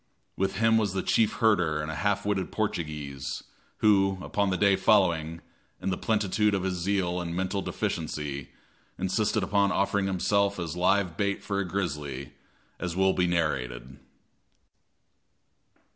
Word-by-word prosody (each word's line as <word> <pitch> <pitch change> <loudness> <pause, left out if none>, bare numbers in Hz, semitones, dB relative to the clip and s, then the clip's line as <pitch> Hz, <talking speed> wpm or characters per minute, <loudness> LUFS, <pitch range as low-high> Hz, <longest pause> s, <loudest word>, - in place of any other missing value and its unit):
With 95 0 -1
him 115 +2 +4
was 100 -4 0
the 95 - -1
chief 110 - +2
herder 90 -9 +2
and 75 +1 -3
a - - -5
half 100 +5 0
witted 100 -2 -1
Portuguese, 75 -9 -3 0.4
who, 95 -2 +4
upon 100 -1 0
the 95 - 0
day 100 0 +4
following, 85 -7 +2 0.4
in 95 - -2
the - - 0
plenitude 105 -1 +1
of 95 - -1
his 95 -1 0
zeal 90 0 0
and 85 -1 -4
mental 95 +2 -1
deficiency, 70 -6 -3 0.5
insisted 105 +2 0
upon 100 +1 +2
offering 100 0 +1
himself 100 +2 +1
as 85 -3 -4
live 90 -1 +1
bait 100 0 -1
for 100 -1 -2
a 100 - -1
grizzly, 75 -8 -4 0.5
as 90 -2 -3
will 95 0 +3
be 90 -1 +1
narrated. 65 -6 -2
95 Hz, 145 wpm, -28 LUFS, 85-100 Hz, 0.5 s, him